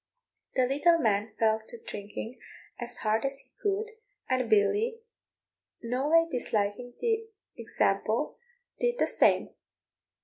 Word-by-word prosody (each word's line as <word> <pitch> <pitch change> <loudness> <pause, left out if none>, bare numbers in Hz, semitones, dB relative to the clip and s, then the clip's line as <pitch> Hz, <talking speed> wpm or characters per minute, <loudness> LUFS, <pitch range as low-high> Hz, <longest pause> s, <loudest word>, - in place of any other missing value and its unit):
The 255 - +4
little 295 +6 +4
man 215 -5 +1
fell 220 -1 +3
to - - -9
drinking 225 - -7 0.4
as 245 0 -3
hard 220 0 +2
as 275 0 -1
he - - -21
could, 420 +2 0 0.4
and 255 -2 0
Billy, 410 - +3 0.9
noway 290 +8 +3
disliking 240 0 -1
the 450 -1 0 0.3
example, - - 0 0.4
did 485 0 +1
the - - +3
same. - - +3
255 Hz, 115 wpm, -29 LUFS, -, 0.9 s, The